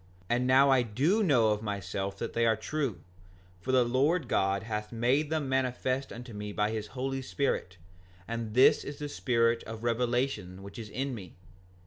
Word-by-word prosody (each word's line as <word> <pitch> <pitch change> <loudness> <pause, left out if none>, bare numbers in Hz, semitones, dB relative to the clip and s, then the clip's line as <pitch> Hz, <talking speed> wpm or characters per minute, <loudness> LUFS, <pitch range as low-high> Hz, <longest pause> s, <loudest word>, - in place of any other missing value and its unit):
And 125 +1 +2
now 135 +2 +6
I 130 -2 +5
do 140 - +1
know 130 - +4
of 105 0 -1
myself 100 -1 -3
that 115 - -4
they 115 0 +2
are 110 - +4
true; 140 -3 -3 0.6
for 130 - -3
the 130 -1 +5
Lord 140 +8 +1
God 95 0 +1
hath 105 -1 -4
made 125 +6 +1
them 155 -3 -1
manifest 130 0 -1
unto 120 0 -8
me 105 0 -5
by 105 +1 0
his 110 -1 -3
Holy 135 +1 -2
Spirit; 125 -9 -2 0.5
and 115 -2 -4
this 130 - +6
is 145 - -7
the 150 - -4
spirit 115 -4 +1
of 110 0 -7
revelation 120 -5 -1
which 100 +3 -9
is 110 -2 -7
in 135 +4 -3
me. 100 -6 -9
120 Hz, 180 wpm, -30 LUFS, 105-135 Hz, 0.6 s, now